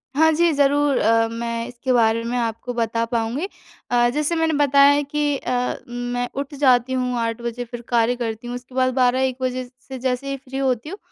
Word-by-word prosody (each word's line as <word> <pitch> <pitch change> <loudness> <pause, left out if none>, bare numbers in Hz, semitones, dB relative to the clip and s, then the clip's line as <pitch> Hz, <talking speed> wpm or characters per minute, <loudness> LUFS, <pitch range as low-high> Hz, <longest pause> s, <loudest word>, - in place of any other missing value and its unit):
हाँ 320 +1 +5
जी, 340 +1 +3
ज़रूर 285 0 +3
अ, 225 +1 +3
मैं 230 0 -3
इसके 250 +1 -2
बारे 230 -1 +3
में 240 +2 -2
आपको 230 +1 -3
बता 230 0 0
पाऊँगी। 235 +9 -1 0.4
अ, 240 0 +4
जैसे 300 +3 0
मैंने 325 -1 +1
बताया 280 0 +6
है 290 0 +2
कि 290 0 -1
अ, 250 0 -1
मैं 245 0 -3
उठ 280 +2 -4
जाती 260 -2 +3
हूँ, 250 -1 -1
8 230 0 -2
बजे 235 +1 -4
फिर 240 0 -8
कार्य 240 0 +2
करती 230 0 -4
हूँ, 245 - -4
उसके 250 +1 -10
बाद 255 -1 +2
12-1 255 0 +2
बजे 255 0 -1 0.2
से 265 -1 -7
जैसे 260 +2 -2
ही 275 - -2
फ्री 270 0 -8
होती 265 +1 -1
हूँ 390 - -6
250 Hz, 205 wpm, -22 LUFS, 235-275 Hz, 0.4 s, बताया